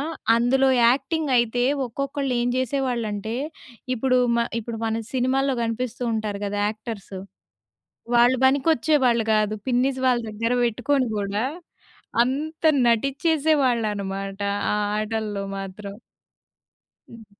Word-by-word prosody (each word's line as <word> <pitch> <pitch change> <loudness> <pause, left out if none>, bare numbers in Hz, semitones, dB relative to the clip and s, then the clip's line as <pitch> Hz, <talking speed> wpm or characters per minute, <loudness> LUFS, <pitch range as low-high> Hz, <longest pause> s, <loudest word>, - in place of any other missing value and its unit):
ఆ! - - -1 0.3
అందులో 265 +3 +3 0.2
యాక్టింగ్ 285 +5 +1
అయితే 240 +1 +1 0.2
ఒక్కొక్కళ్ళు 275 +2 -3
ఏం 240 - 0
జేసేవాళ్ళంటే, 235 -5 -2 0.6
ఇప్పుడు 255 +1 +2 0.2
మ - - +1 0.2
ఇప్పుడు 225 0 -6
మన 225 0 -1
సినిమాల్లో 260 +1 +1
కనిపిస్తూ 235 +2 -3
ఉంటారు 210 -2 -3
గదా! 205 +1 -3
యాక్టర్స్. 215 -3 -8 1.0
వాళ్ళు 240 +2 +5
బనికొచ్చేవాళ్ళు 265 -3 +3
గాదు. 215 0 +2
పిన్నీస్ 260 +1 +1
వాళ్ళ 245 -1 +3
దగ్గర 230 +3 -2
పెట్టుకొని 250 +3 0
గూడా 205 +2 -1 0.8
అంత 300 +6 -4 0.2
నటించేసేవాళ్ళన్నమాట. 235 - 0 0.3
ఆ - - +1 0.2
ఆటల్లో 215 -2 -3 0.2
మాత్రం. 200 +1 -8 1.1
హ్మ్. 230 -2 -13
240 Hz, 105 wpm, -23 LUFS, 215-265 Hz, 1.1 s, వాళ్ళు